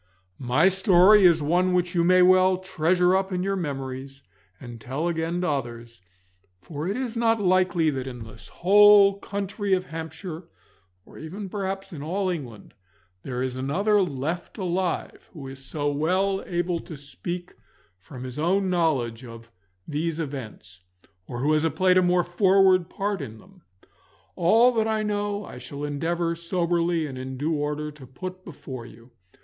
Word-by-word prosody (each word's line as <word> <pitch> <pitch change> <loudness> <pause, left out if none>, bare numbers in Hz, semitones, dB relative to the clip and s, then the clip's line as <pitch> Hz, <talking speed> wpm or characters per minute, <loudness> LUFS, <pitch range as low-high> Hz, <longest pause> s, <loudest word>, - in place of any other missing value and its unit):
My 125 +7 +3
story 190 +1 +5
is 165 -3 +5
one 180 +4 +2
which 180 0 0
you 170 -2 +2
may 185 +1 +5
well 185 0 +5
treasure 180 0 +1
up 190 0 0
in 180 0 -1
your 195 +1 -1
memories, 135 -4 -5 0.4
and 120 -3 -10
tell 140 +8 -3
again 170 +1 -2
to 180 - -1
others, 120 -5 -4 0.6
for 150 - -6
it 200 +4 -2
is 250 -3 -3
not 230 -1 +2
likely 185 -4 +2
that 135 -2 -4
in 125 -3 -7
this 110 -2 -13
whole 200 +1 +6
county 200 0 -3
of 185 -1 +2
Hampshire, 165 +1 -7 0.6
or - - -14
even 190 +6 -7
perhaps 195 -1 -4
in 150 - -7
all 185 +5 -1
England, 125 - -7 0.5
there 125 +2 -4
is 130 -1 -3
another 200 +11 +1
left 165 +1 -3
alive 180 -2 -3
who 140 -5 -9
is 135 0 -9
so 145 +2 -2
well 185 +7 0
able 175 -1 -1
to 160 - -9
speak 175 +5 -6 0.5
from 125 +7 -10
his 130 +2 -7
own 185 +4 +1
knowledge 135 -10 0
of 115 -1 -12 0.4
these 160 +2 -2
events, 120 - -7 0.5
or 120 0 -5
who 150 +3 +2
has 155 +1 +2
played 185 +2 +4
a - - +3
more 180 0 +2
forward 185 0 +3
part 200 0 -3
in 110 0 -7
them. 185 - -19 0.7
All 225 +8 +5
that 220 -1 +1
I 220 -1 0
know 205 -1 -2
I 125 - -10
shall 140 +3 -8
endeavour 165 +4 -1
soberly 170 -1 0
and 130 -3 -7
in 130 0 -6
due 155 +5 -1
order 150 0 -2
to 145 -3 -14
put 185 +8 -8
before 130 -8 -9
you. 115 +2 -16
170 Hz, 165 wpm, -25 LUFS, 140-185 Hz, 0.7 s, whole